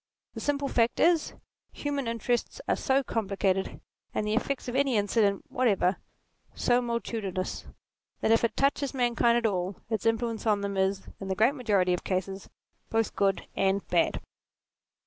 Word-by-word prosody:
The -, -, -6 dB
simple 285 Hz, -1 st, 0 dB
fact 235 Hz, -3 st, +1 dB
is, 335 Hz, -2 st, +3 dB, 0.4 s
human 285 Hz, -3 st, -3 dB
interests 235 Hz, -, -1 dB
are -, -, +2 dB
so 270 Hz, 0 st, +1 dB
compli 210 Hz, -5 st, -3 dB
cated, 190 Hz, -1 st, 0 dB, 0.3 s
and 210 Hz, -, 0 dB
the 210 Hz, -, 0 dB
effects 255 Hz, +4 st, -1 dB
of 245 Hz, -, -3 dB
any 270 Hz, -4 st, +2 dB
incident 205 Hz, -1 st, +2 dB
whatever 200 Hz, -7 st, +2 dB, 0.6 s
so 245 Hz, 0 st, +2 dB
multitudinous, 225 Hz, -6 st, -3 dB, 0.5 s
that -, -, +2 dB
if 225 Hz, -, +4 dB
it 235 Hz, -, 0 dB
touches 275 Hz, 0 st, +1 dB
mankind 240 Hz, -1 st, +3 dB
at 235 Hz, -, 0 dB
all, 185 Hz, -2 st, 0 dB, 0.2 s
its 220 Hz, 0 st, 0 dB
influence 225 Hz, 0 st, 0 dB
on 210 Hz, -2 st, +3 dB
them 200 Hz, 0 st, -3 dB
is, 190 Hz, 0 st, +1 dB, 0.2 s
in 195 Hz, -, -6 dB
the 190 Hz, -, -1 dB
great 225 Hz, +7 st, +4 dB
majority 205 Hz, -9 st, +1 dB
of 180 Hz, -, -2 dB
cases, 190 Hz, +1 st, -3 dB, 0.4 s
both 225 Hz, -1 st, 0 dB
good 195 Hz, -1 st, +1 dB
and 195 Hz, 0 st, +1 dB
bad. -, -, +2 dB
225 Hz, 165 wpm, -28 LUFS, 195-245 Hz, 0.6 s, if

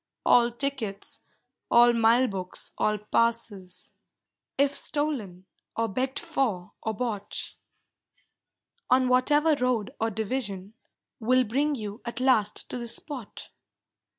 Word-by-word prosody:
All 240 Hz, -1 st, +5 dB
tickets, 240 Hz, -5 st, -3 dB, 0.5 s
all 240 Hz, 0 st, +6 dB
mile 230 Hz, +2 st, +4 dB
books, 185 Hz, -3 st, -4 dB
all 215 Hz, 0 st, +2 dB
passes, 210 Hz, -4 st, -1 dB, 0.6 s
If 280 Hz, +1 st, +2 dB
stolen 240 Hz, -, 0 dB, 0.3 s
or 225 Hz, 0 st, 0 dB
begged 255 Hz, +6 st, -2 dB
for 250 Hz, -, -1 dB
or 220 Hz, -1 st, -3 dB
bought, 210 Hz, -3 st, -4 dB, 1.4 s
On 255 Hz, 0 st, +4 dB
whatever 295 Hz, +5 st, +4 dB
road 250 Hz, -6 st, 0 dB
or 225 Hz, -, +2 dB
division, 210 Hz, -2 st, -4 dB, 0.5 s
Will 255 Hz, +3 st, +3 dB
bring 280 Hz, +6 st, 0 dB
you 210 Hz, -2 st, -6 dB
at 235 Hz, 0 st, -3 dB
last 240 Hz, -6 st, +2 dB
to 250 Hz, -, -4 dB
this 235 Hz, -1 st, 0 dB
spot. 270 Hz, -8 st, -7 dB
235 Hz, 115 wpm, -27 LUFS, 210-260 Hz, 1.4 s, all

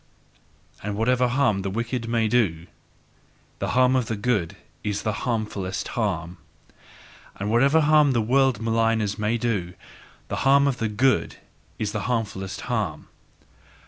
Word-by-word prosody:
And 105 Hz, 0 st, -4 dB
whatever 125 Hz, +3 st, +2 dB
harm 120 Hz, -5 st, +1 dB
the 95 Hz, -, -3 dB
wicked 115 Hz, +3 st, -3 dB
may 115 Hz, -1 st, +1 dB
do, 100 Hz, -8 st, +1 dB, 0.9 s
the -, -, -2 dB
harm 130 Hz, 0 st, +4 dB
of 125 Hz, -3 st, +1 dB
the 115 Hz, -, -2 dB
good 105 Hz, -6 st, -1 dB, 0.3 s
is 105 Hz, -1 st, -2 dB
the 110 Hz, -, 0 dB, 0.2 s
harmfulest 105 Hz, -5 st, -3 dB
harm! 90 Hz, -6 st, -2 dB, 1.0 s
And 100 Hz, +2 st, -3 dB
whatever 140 Hz, +7 st, +4 dB
harm 150 Hz, -2 st, +4 dB
the 120 Hz, -, +2 dB
world 130 Hz, 0 st, +2 dB
maligners 115 Hz, -2 st, 0 dB
may 110 Hz, +2 st, 0 dB
do, 100 Hz, -7 st, -2 dB, 0.5 s
the -, -, -3 dB
harm 140 Hz, +1 st, +4 dB
of 135 Hz, -3 st, 0 dB
the 115 Hz, -2 st, -1 dB
good 130 Hz, +5 st, +1 dB, 0.4 s
is 105 Hz, -1 st, -2 dB
the 105 Hz, -2 st, -3 dB
harmfulest 100 Hz, -5 st, -3 dB
harm! -, -, -3 dB
115 Hz, 145 wpm, -24 LUFS, 100-125 Hz, 1.0 s, harm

